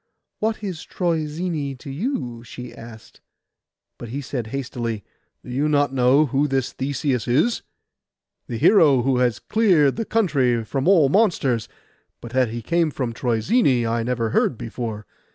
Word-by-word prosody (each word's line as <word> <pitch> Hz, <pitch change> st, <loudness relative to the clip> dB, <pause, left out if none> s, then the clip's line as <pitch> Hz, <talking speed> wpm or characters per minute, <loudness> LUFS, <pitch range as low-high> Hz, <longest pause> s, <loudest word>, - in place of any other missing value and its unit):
'What 220 Hz, 0 st, -1 dB
is 185 Hz, -6 st, -5 dB
Troezene 160 Hz, -4 st, -2 dB
to 140 Hz, +2 st, -9 dB
you?' 135 Hz, -, -3 dB
she 120 Hz, 0 st, -9 dB
asked. 115 Hz, -1 st, -13 dB, 0.8 s
But 120 Hz, -, -8 dB
he 135 Hz, +5 st, -4 dB
said 125 Hz, -4 st, -4 dB
hastily, 120 Hz, -4 st, -4 dB, 0.4 s
'Do 125 Hz, -, -8 dB
you 140 Hz, +4 st, 0 dB
not 145 Hz, -2 st, +2 dB
know 130 Hz, +3 st, +4 dB
who 140 Hz, +2 st, +1 dB
this 135 Hz, -3 st, -1 dB
Theseus 135 Hz, -2 st, -2 dB
is? 155 Hz, -, +2 dB, 0.9 s
The 115 Hz, -, -4 dB
hero 145 Hz, -, +5 dB
who 130 Hz, 0 st, +2 dB
has 125 Hz, -3 st, +2 dB
cleared 185 Hz, -11 st, +2 dB
the 225 Hz, -, -2 dB
country 135 Hz, -, +1 dB
from 135 Hz, +6 st, -2 dB
all 170 Hz, -8 st, +5 dB
monsters; 145 Hz, -, +1 dB, 0.5 s
but 120 Hz, -, -10 dB
that 130 Hz, -2 st, +2 dB
he 115 Hz, +1 st, -5 dB
came 170 Hz, +4 st, +1 dB
from 130 Hz, -5 st, -3 dB
Troezene, 125 Hz, -, +1 dB
I 115 Hz, +1 st, 0 dB
never 115 Hz, -1 st, -1 dB
heard 115 Hz, -, +1 dB
before. 110 Hz, -2 st, -5 dB
135 Hz, 155 wpm, -22 LUFS, 120-155 Hz, 0.9 s, hero